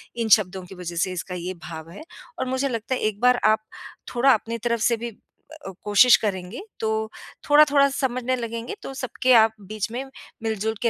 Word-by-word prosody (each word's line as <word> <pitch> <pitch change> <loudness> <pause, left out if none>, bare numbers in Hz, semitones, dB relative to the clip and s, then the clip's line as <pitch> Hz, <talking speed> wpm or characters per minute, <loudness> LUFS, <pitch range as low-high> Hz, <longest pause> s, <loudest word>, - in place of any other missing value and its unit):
इन 230 -2 -2
शब्दों 190 -2 -6
की 190 - -12
वजह 175 -1 -7
से 185 +2 0
इसका 180 +1 -5
ये 180 +1 -4
भाव 160 -1 -8
है। 185 - -10 0.4
और - - -1
मुझे 260 +2 -1
लगता 230 +1 -2
है - - -5
एक 215 -1 -1
बार 250 0 +4
आप 215 0 +4 0.6
थोड़ा 265 +3 +5
अपनी 230 +2 -2
तरफ 235 0 -1
से 235 +2 +2
भी 230 -1 -7 0.5
अ, - - -5
कोशिश 210 +4 +6
करेंगे, 190 - -4 0.2
तो 220 0 -1 0.4
थोड़ा-थोड़ा 290 -1 +6
समझने 255 -2 -1
लगेंगे 230 - -5
तो - - -6
सबके 255 -1 0
आप 225 -1 +6 0.2
बीच 215 +1 -3
में 250 +3 -4 0.4
मिलजुल 220 0 -1
के 235 - +3
225 Hz, 195 wpm, -24 LUFS, 205-250 Hz, 0.6 s, कोशिश